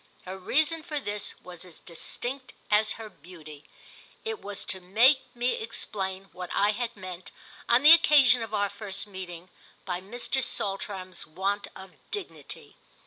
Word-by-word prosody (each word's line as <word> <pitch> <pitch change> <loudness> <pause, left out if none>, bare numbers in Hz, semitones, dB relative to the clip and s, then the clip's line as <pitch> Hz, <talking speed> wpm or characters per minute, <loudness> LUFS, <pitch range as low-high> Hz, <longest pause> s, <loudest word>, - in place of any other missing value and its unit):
Her 185 +1 -5
reason 310 - +2
for 310 -2 -3
this 205 -5 -3
was 180 -1 -8
as 180 -3 -11
distinct 250 +9 -2 0.2
as 215 +1 +4
her 225 -1 -8
beauty: 155 -5 -13 0.6
it 445 0 -3
was 200 0 -5
to 190 - 0
make 235 +10 +5
me 245 +1 +2
explain 195 - -2
what 180 -1 -7
I 205 +1 +4
had 235 +2 -3
meant, 185 -3 -8 0.4
on 235 +3 +5
the 300 - +10
occasion 280 -7 +7
of 225 -2 -5
our 205 -2 +1
first 200 -1 -4
meeting, 185 -3 -8 0.4
by 180 -1 -2
Mr. 245 +6 -2
Saltram's 195 -5 -3
want 195 +5 -1
of 190 0 -10 0.2
dignity. 410 -4 -8
205 Hz, 150 wpm, -28 LUFS, 185-245 Hz, 0.6 s, the